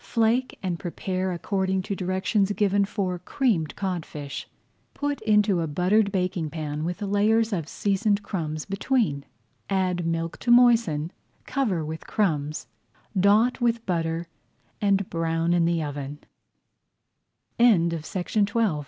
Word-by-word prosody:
Flake 235 Hz, +3 st, +1 dB
and 175 Hz, -3 st, -2 dB
prepare 185 Hz, +2 st, -3 dB
according 190 Hz, +1 st, -1 dB
to 200 Hz, -, -3 dB
directions 190 Hz, +2 st, 0 dB
given 200 Hz, -1 st, +2 dB
for 190 Hz, -3 st, -2 dB
Creamed 180 Hz, -, 0 dB
Codfish. 160 Hz, -7 st, -4 dB, 0.5 s
Put 290 Hz, 0 st, -2 dB
into 210 Hz, -4 st, +3 dB
a 165 Hz, -, -1 dB
buttered 190 Hz, +7 st, +2 dB
baking 180 Hz, -4 st, -1 dB
pan 150 Hz, -1 st, -4 dB
with 180 Hz, +5 st, -3 dB
layers 215 Hz, +3 st, +2 dB
of 165 Hz, -6 st, -2 dB
seasoned 205 Hz, 0 st, 0 dB
crumbs 155 Hz, -6 st, -3 dB
between, 195 Hz, -, 0 dB, 0.4 s
add 185 Hz, -2 st, 0 dB
milk 165 Hz, 0 st, -2 dB
to -, -, -4 dB
moisten, 230 Hz, -11 st, +4 dB, 0.3 s
cover 205 Hz, -, -1 dB
with 160 Hz, +1 st, -7 dB
crumbs, 155 Hz, -8 st, -1 dB, 0.5 s
dot 210 Hz, +7 st, +3 dB
with 235 Hz, -1 st, +1 dB
butter, 165 Hz, -1 st, -1 dB, 0.6 s
and 200 Hz, -2 st, +2 dB
brown 165 Hz, 0 st, 0 dB
in 170 Hz, -1 st, +3 dB
the 170 Hz, -1 st, +1 dB
190 Hz, 115 wpm, -25 LUFS, 165-210 Hz, 0.6 s, moisten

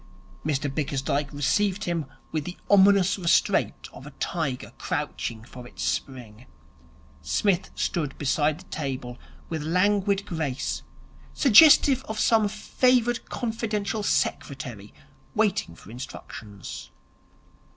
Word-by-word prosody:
Mr 145 Hz, -1 st, -1 dB
Bickersdyke 140 Hz, 0 st, -2 dB
received 195 Hz, +8 st, 0 dB
him 170 Hz, -6 st, -2 dB, 0.2 s
with 155 Hz, -2 st, -1 dB
the 180 Hz, -, -6 dB
ominous 195 Hz, -1 st, +5 dB
restraint 170 Hz, -2 st, +1 dB
of -, -, -11 dB
a -, -, -9 dB
tiger 145 Hz, -8 st, -3 dB
crouching 110 Hz, -2 st, -3 dB
for 125 Hz, +1 st, -11 dB
its -, -, -7 dB
spring. 125 Hz, -3 st, -4 dB, 0.7 s
Psmith 175 Hz, -, +1 dB
stood 150 Hz, -6 st, -2 dB
beside 145 Hz, +2 st, +1 dB
the -, -, -13 dB
table 130 Hz, -5 st, -4 dB, 0.3 s
with 160 Hz, -3 st, -3 dB
languid 195 Hz, +4 st, +1 dB
grace, 155 Hz, -7 st, -3 dB, 0.5 s
suggestive 270 Hz, +1 st, +7 dB
of 220 Hz, 0 st, -5 dB
some 220 Hz, -2 st, +4 dB
favoured 240 Hz, +3 st, +1 dB
confidential 220 Hz, -2 st, -2 dB
secretary -, -, -2 dB, 0.4 s
waiting 205 Hz, -, 0 dB
for 100 Hz, -, -14 dB
instructions. 110 Hz, -4 st, -9 dB
170 Hz, 110 wpm, -26 LUFS, 135-205 Hz, 0.7 s, suggestive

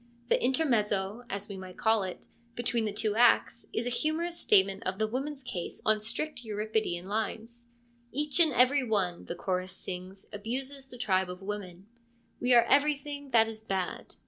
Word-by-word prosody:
The -, -, +3 dB
intermezzo, 230 Hz, -5 st, +1 dB
as 200 Hz, +1 st, -3 dB
we 200 Hz, -, -6 dB
might 185 Hz, -1 st, -9 dB
call 220 Hz, -1 st, +3 dB
it, 185 Hz, -2 st, -5 dB, 0.3 s
between 235 Hz, -1 st, 0 dB
the 210 Hz, -, -1 dB
two 210 Hz, +1 st, 0 dB
acts 235 Hz, 0 st, +4 dB
is 235 Hz, -, -2 dB
a -, -, 0 dB
humorous 330 Hz, +6 st, -1 dB
statement 195 Hz, -1 st, +4 dB
of 185 Hz, +1 st, -2 dB
the 215 Hz, -, +1 dB
women's 270 Hz, +4 st, -4 dB
case 180 Hz, -9 st, -4 dB
on 215 Hz, 0 st, +4 dB
strict 245 Hz, +5 st, -3 dB
Euripidean 215 Hz, -4 st, -1 dB
lines: 225 Hz, +3 st, -4 dB, 0.4 s
Each 295 Hz, +3 st, 0 dB
and 325 Hz, -3 st, +6 dB
every 260 Hz, +2 st, +4 dB
one 200 Hz, -7 st, -1 dB
[the 170 Hz, -, -5 dB
chorus 185 Hz, 0 st, -3 dB
sings] 185 Hz, +1 st, -6 dB
abuses 265 Hz, +6 st, -3 dB
the 250 Hz, -, -10 dB
tribe 190 Hz, -5 st, +1 dB
of 180 Hz, +1 st, -8 dB
women: 195 Hz, -3 st, -6 dB, 0.5 s
we 245 Hz, -, +1 dB
are 235 Hz, -, +8 dB
everything 285 Hz, 0 st, +1 dB
that 225 Hz, -3 st, +5 dB
is 220 Hz, -1 st, -5 dB
bad. 190 Hz, -4 st, -3 dB
220 Hz, 170 wpm, -30 LUFS, 195-255 Hz, 0.5 s, are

